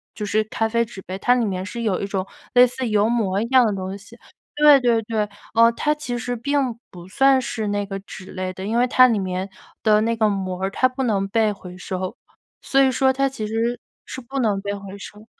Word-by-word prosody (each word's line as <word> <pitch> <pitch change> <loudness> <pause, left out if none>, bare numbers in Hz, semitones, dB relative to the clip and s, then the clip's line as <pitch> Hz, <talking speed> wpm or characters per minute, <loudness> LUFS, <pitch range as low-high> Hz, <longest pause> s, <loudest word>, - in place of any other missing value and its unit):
就 210 - -4
是 215 +1 +1
咖 220 +1 -1
啡 235 +1 +1
纸 215 -4 -10
杯， 190 +1 -6
它 245 +4 +3
里 240 -2 +1
面 185 -3 -3
是 235 +4 -6
有 205 -5 0
一 200 - -2
种 195 -2 -2 0.3
类 245 0 +8
似 250 0 -3
油 210 0 +3
膜 215 -5 0
一 220 - -1
样 255 +1 +5
的 210 - 0
东 190 0 -5
西。 200 +4 -14 0.4
对 295 -1 +9
对 235 -2 +2
对， 215 -1 -2 0.2
呃， 230 +1 +6
它 300 +6 0
其 250 -5 -4
实 245 +1 -3
并 265 -1 -1
不 175 -2 -11
算 270 +6 +3
是 220 -3 -3
那 205 0 -1
个 195 0 -5
纸 190 -1 -11
类 185 0 -3
的， 190 +1 -7
因 220 +3 -1
为 245 - +4
它 255 +1 +6
里 230 -3 +1
面 185 0 -3 0.3
的 215 -1 +4
那 230 +1 +1
个 215 -1 +3
膜 190 -3 -3
儿 195 - +1
它 255 +6 +2
不 260 +1 -4
能 205 -5 +1
被 220 0 +2
回 180 -2 -11
收。 185 0 -5 0.4
所 275 - +2
以 265 -1 +4
说 265 +1 +2
它 275 +1 +1
其 220 -5 -5
实 230 +3 -1 0.3
是 - - -7
不 265 +2 -8
能 210 -5 +1
被 200 +1 -4
回 200 0 -9
收。 210 +1 -11
220 Hz, 255 characters per minute, -22 LUFS, 195-245 Hz, 0.4 s, 对